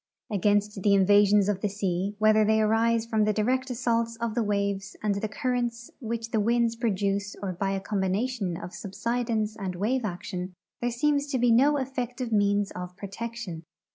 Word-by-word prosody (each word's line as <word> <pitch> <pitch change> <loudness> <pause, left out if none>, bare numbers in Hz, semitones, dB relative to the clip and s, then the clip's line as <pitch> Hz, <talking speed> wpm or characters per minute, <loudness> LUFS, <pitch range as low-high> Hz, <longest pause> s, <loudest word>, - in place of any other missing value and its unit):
Against 205 0 +1
the 200 +1 +4
invasions 205 +1 +5
of 200 -2 0
the 210 - 0
sea, 195 0 -2
whether 215 0 +4
they 220 +1 +3
arise 225 +1 +2
from 220 -2 +1
the 215 - +2
direct 255 +5 0
assaults 230 -2 0
of 230 -1 -3
the 240 - 0
waves 200 -2 -1
and 210 -1 +2
the 200 +2 -2
currents 240 +1 -2
which 230 -1 -4
the 220 - +1
winds 230 +1 +2
produce 200 -3 -1
or 190 -2 -2
by 195 +3 -2
a 195 0 -1
combination 195 0 -1
of 180 - -8
subsidence 220 +2 -2
and 190 -3 -4
wave 230 +7 0
action, 185 -2 -5 0.3
there 240 - +1
seems 285 +4 +1
to 280 -2 -1
be 245 -1 +3
no 280 +6 +5
effective 250 -2 -3
means 205 -1 +2
of 180 0 -7
protection. 205 -3 -6
215 Hz, 175 wpm, -27 LUFS, 200-235 Hz, 0.3 s, invasions